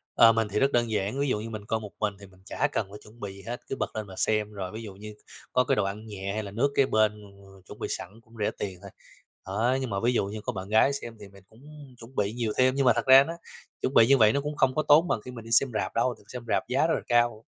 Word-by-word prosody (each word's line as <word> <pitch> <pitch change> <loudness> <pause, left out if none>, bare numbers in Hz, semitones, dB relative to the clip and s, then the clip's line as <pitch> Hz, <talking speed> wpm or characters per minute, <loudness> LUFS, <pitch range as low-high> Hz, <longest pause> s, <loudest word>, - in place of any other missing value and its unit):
Ờ, 115 0 +8
mình 115 -1 0
thì 105 - 0
rất 140 +1 +3
đơn 120 -2 +1
giản, 105 +5 -1
ví 140 - +1
dụ 105 - 0
như 115 +1 -6
mình 110 -2 -7
coi 110 +1 -1
một 105 -2 -9
mình 105 -1 0
thì 100 - -11
mình 95 -1 -20
chả 145 +7 0
cần 105 - -1
phải 105 - -10
chuẩn 110 +3 -17
bị 100 -3 -6
gì 100 - -12
hết, 120 +4 -6
cứ - - -3
bật - - -4
lên 110 -1 -4
mà 95 - -11
xem, 105 -1 +1
rồi 95 -3 -6
ví 110 +1 -7
dụ 105 -3 -8
như 105 +2 -9 0.4
có 125 - +4
cái - - +1
đồ 105 - +1
ăn 100 +3 -5
nhẹ 100 -2 -5
hay 110 +1 -3
là 100 - -8
nước 135 +7 +1
kế 135 - +4
bên 105 -3 +1
mà 100 - -14 0.3
mà - - -17
chuẩn - - -11
bị - - -3
sẵn 105 +6 -5
cũng 115 0 -24
rẻ 105 - 0
tiền 95 -3 -4
thôi. 100 - -11 0.6
Đó, 115 +7 +1
nhưng 130 - -3
mà 100 - -2
ví 125 - +3
dụ 115 - +1
như 105 +2 -6
có - - -3
bạn 95 0 -6
gái 110 +6 +4
xem 120 -5 -6
thì 105 - -10
mình 100 -1 -18
cũng 140 +2 -15
chuẩn 120 +3 -13
bị 105 +1 0
nhiều 115 -3 -2
thêm, 130 0 +4
nhưng 135 -1 +1
mà 125 - +6
thật - - -2
ra 135 +1 +9
nó 165 - -5 0.5
chuẩn 130 - -1
bị 115 - +6
như 135 +1 +6
vậy 110 -2 +5
nó 140 - 0
cũng 150 +1 -4
không 130 -1 +2
có 155 - +1
tốn 155 +4 +6
bằng 110 - -1
khi 125 - -7
mình 115 -2 -10
đi 115 - -10
xem 130 +3 +5
rạp - - -2
đâu, 120 +1 +1
thường 105 - -22
xem 125 -1 -6
rạp - - 0
giá 135 +5 +2
rất - - +1
là - - -3
cao. 120 -2 +2
110 Hz, 325 wpm, -27 LUFS, 105-130 Hz, 0.6 s, ra